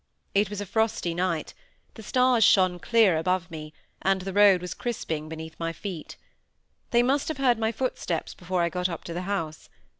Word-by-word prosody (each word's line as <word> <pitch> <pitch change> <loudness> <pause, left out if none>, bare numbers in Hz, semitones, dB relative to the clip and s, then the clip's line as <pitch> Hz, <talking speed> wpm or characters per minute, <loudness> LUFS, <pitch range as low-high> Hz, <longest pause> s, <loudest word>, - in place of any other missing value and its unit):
It 200 0 +2
was 205 -1 -5
a 205 - -3
frosty 220 -4 0
night, 175 -2 -1 0.4
the 225 - -11
stars 250 +1 +3
shone 185 -3 +4
clear 220 -5 +4
above 180 +1 -1
me, 155 -1 -7 0.3
and 190 0 +2
the 195 0 -4
road 200 -2 +6
was 180 0 -5
crisping 160 -10 -4
beneath 160 0 -7
my 165 0 -1
feet. 170 -1 -7 0.7
They 240 0 +4
must 275 +3 +1
have 315 - -3
heard 250 -4 +3
my 220 0 +1
footsteps 230 -8 -3
before 180 0 -2
I 170 - +1
got 180 +2 -1
up 170 - -6
to 170 - -6
the 175 - -3
house. 165 -6 -3
185 Hz, 190 wpm, -26 LUFS, 170-220 Hz, 0.7 s, road